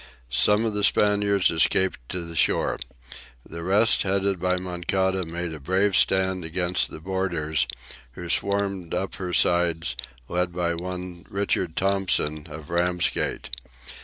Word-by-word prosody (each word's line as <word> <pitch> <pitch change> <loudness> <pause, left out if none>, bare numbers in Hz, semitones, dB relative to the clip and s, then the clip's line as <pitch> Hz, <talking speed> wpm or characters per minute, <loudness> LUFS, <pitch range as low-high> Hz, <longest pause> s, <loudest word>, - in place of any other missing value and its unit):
Some 105 - +4
of 110 - -1
the 105 0 -2
Spaniards 100 -2 +3
escaped 90 +3 +2
to 90 - -3
the 85 -1 -8
shore. - - +1 0.7
The 85 +1 -7
rest, 100 +5 +4
headed 100 -1 0
by 90 +1 +1
Moncada, 95 +1 -1
made 85 0 -4
a 80 - -8
brave 95 +6 +1
stand 95 -1 +2
against 90 +2 0
the - - -9
boarders, 80 -6 -1 0.5
who 90 +7 -8
swarmed 100 -1 0
up 95 - -2
her 90 -2 -4
sides, 85 -7 +2 0.3
led 90 0 -1
by 85 -1 0
one 90 0 -6
Richard 95 -4 -1
Tomson, 95 -6 +1
of 75 0 -9
Ramsgate. 90 0 0
90 Hz, 135 wpm, -25 LUFS, 85-95 Hz, 0.7 s, Some